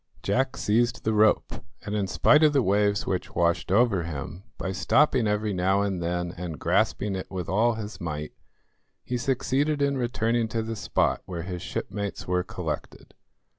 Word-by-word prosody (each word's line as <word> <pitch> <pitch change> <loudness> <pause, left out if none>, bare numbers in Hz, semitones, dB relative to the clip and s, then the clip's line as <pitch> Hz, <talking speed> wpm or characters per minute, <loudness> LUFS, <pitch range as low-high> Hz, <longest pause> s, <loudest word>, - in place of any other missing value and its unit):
Jack 130 +6 0
seized 115 +3 +1
the 110 - +1
rope, 110 0 +3 0.3
and 105 - -4
in 100 -2 0
spite 150 +10 +4
of 155 -1 +5
the 135 -3 +3
waves 100 0 +2
which 90 -2 -3
washed 85 +1 +1
over 100 -3 +3
him, 80 +1 -6 0.2
by 95 - -3
stopping 130 +3 +3
every 105 0 0
now 95 +2 +2
and 95 -3 -2
then 85 +1 -2
and 85 -3 -6
grasping 100 -1 +1
it 95 - -5
with 90 -3 -4
all 110 +6 +2
his 110 -2 -7
might, 75 -2 -4 0.7
he 125 - -3
succeeded 135 +4 0
in 140 -1 +1
returning 120 -1 0
to 115 0 -2
the 115 0 -4
spot 95 -5 0
where 85 -3 -5
his 90 0 -5
shipmates 100 -1 -4
were 90 0 +1
collected. - - -6
105 Hz, 170 wpm, -26 LUFS, 90-120 Hz, 0.7 s, of